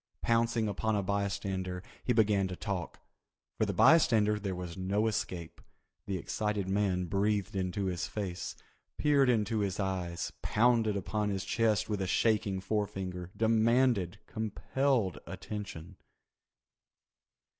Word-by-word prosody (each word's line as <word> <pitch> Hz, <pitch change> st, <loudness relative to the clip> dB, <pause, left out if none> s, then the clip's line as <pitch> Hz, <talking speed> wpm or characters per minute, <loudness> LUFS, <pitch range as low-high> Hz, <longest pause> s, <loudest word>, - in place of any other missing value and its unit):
Pouncing 115 Hz, -1 st, +2 dB
upon 105 Hz, +2 st, 0 dB
a 100 Hz, -, 0 dB
bystander 95 Hz, -2 st, -2 dB, 0.2 s
he -, -, 0 dB
began 105 Hz, -4 st, +3 dB
to 90 Hz, -, -5 dB
talk. 95 Hz, -3 st, -4 dB, 0.6 s
For -, -, +2 dB
the -, -, -1 dB
bystander 110 Hz, -10 st, +5 dB
there 95 Hz, -2 st, -3 dB
was 90 Hz, -2 st, -6 dB
no 100 Hz, +3 st, 0 dB
escape. 95 Hz, -6 st, -3 dB, 0.5 s
The 95 Hz, -1 st, -1 dB
excited 105 Hz, +1 st, -2 dB
man 95 Hz, -2 st, +1 dB
breathed 100 Hz, +2 st, 0 dB
into 95 Hz, +1 st, -1 dB
his 90 Hz, 0 st, -2 dB
face, 95 Hz, -4 st, -4 dB, 0.4 s
peered 140 Hz, -3 st, +4 dB
into 110 Hz, -2 st, +1 dB
his 100 Hz, -2 st, -1 dB
eyes, 90 Hz, -3 st, -2 dB
pounded 115 Hz, -2 st, +3 dB
upon 105 Hz, +2 st, -1 dB
his 95 Hz, -2 st, -2 dB
chest 110 Hz, -3 st, +1 dB
with 105 Hz, -2 st, -2 dB
a 95 Hz, -, -1 dB
shaking 105 Hz, -2 st, +1 dB
forefinger, 95 Hz, -4 st, -3 dB
demanded, 115 Hz, -3 st, +3 dB
compelled 110 Hz, 0 st, -1 dB
attention. 100 Hz, -4 st, -7 dB
100 Hz, 125 wpm, -31 LUFS, 95-110 Hz, 0.6 s, bystander